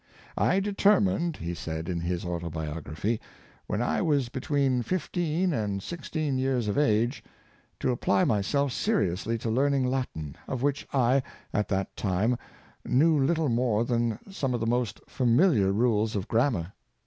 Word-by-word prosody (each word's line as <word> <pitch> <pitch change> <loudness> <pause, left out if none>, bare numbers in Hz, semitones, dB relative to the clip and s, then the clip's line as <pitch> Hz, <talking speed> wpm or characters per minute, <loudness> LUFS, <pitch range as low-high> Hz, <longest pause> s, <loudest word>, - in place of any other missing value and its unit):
" - - -24 0.2
I - - +3
determined," 195 - +2
he 85 +1 -4
said, 80 -1 -5
in 90 -2 -2
his 85 +1 -2
autobiography, 80 +3 -3 0.2
" - - -29
when 105 +3 -1
I - - 0
was 145 -7 +1
between 135 -1 0
fifteen 175 - -1
and 100 -5 -2
six 170 -1 -7
teen 150 -5 -1
years 130 -4 0
of 100 - 0
^ge, 120 -2 +2 0.6
to - - +2
apply 100 -5 +2
myself 135 +7 +1
seriously 115 - 0
to 115 0 -3
learn 140 +4 +2
ing 130 -2 +1
Latin, 125 - -3
of 130 -1 -3
which 145 0 0
I, 130 0 +3 0.3
at 105 - +1
that 95 -1 -2
time, 105 +5 0 0.4
knew 155 +5 +3
little 160 +1 +1
more 120 -2 +1
than 120 -2 0
some 135 -9 -1
of - - -1
the 115 - -1
most 120 0 0
familiar 120 - +3
rules 110 0 +1
of 100 +1 -2
grammar. 110 - +1
120 Hz, 160 wpm, -28 LUFS, 100-140 Hz, 0.6 s, I